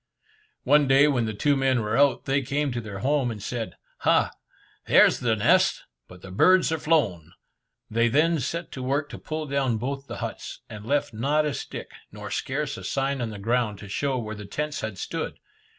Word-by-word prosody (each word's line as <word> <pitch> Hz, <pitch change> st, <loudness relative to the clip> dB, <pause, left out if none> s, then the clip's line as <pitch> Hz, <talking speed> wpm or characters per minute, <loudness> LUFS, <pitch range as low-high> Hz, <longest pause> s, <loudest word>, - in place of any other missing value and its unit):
One 145 Hz, -1 st, +4 dB
day 135 Hz, +2 st, +6 dB
when 125 Hz, -6 st, +1 dB
the 110 Hz, -, -3 dB
two 145 Hz, +7 st, +2 dB
men 135 Hz, -3 st, +2 dB
were 105 Hz, +1 st, -1 dB
out, 140 Hz, +1 st, +3 dB
they 135 Hz, +1 st, +1 dB
came 140 Hz, +2 st, -1 dB
to 120 Hz, -1 st, -3 dB
their 105 Hz, -3 st, -7 dB
home, 140 Hz, -3 st, +2 dB
and 110 Hz, -3 st, -5 dB
said, 115 Hz, +2 st, -4 dB, 0.2 s
"Ha! -, -, +3 dB, 0.6 s
there's -, -, +6 dB
the 115 Hz, -3 st, +1 dB
nest, 100 Hz, -, +3 dB, 0.2 s
but 90 Hz, 0 st, -14 dB
the 95 Hz, -, -9 dB
birds 185 Hz, -, +4 dB
are 160 Hz, -, -1 dB
flown." 100 Hz, -, 0 dB, 0.5 s
They 115 Hz, +2 st, +2 dB
then 155 Hz, +6 st, +3 dB
set 165 Hz, +6 st, -4 dB
to 130 Hz, -, -6 dB
work 140 Hz, +3 st, -1 dB
to -, -, -8 dB
pull 155 Hz, 0 st, -4 dB
down 135 Hz, -5 st, 0 dB
both 135 Hz, +4 st, -4 dB
the -, -, -6 dB
huts, -, -, -6 dB
and 105 Hz, 0 st, -9 dB
left 145 Hz, -2 st, 0 dB
not 145 Hz, +7 st, +1 dB
a 150 Hz, -, -1 dB
stick, -, -, -7 dB, 0.2 s
nor -, -, -8 dB
scarce 145 Hz, +1 st, -2 dB
a -, -, -9 dB
sign 135 Hz, -1 st, -1 dB
on 115 Hz, -, -2 dB
the 105 Hz, -, -7 dB
ground 115 Hz, 0 st, 0 dB
to 100 Hz, -, -10 dB
show 135 Hz, +6 st, -1 dB
where 110 Hz, -3 st, -4 dB
the 105 Hz, -1 st, -8 dB
tents 150 Hz, +7 st, -3 dB
had 110 Hz, -3 st, -4 dB
stood. -, -, -4 dB
135 Hz, 205 wpm, -25 LUFS, 110-145 Hz, 0.6 s, day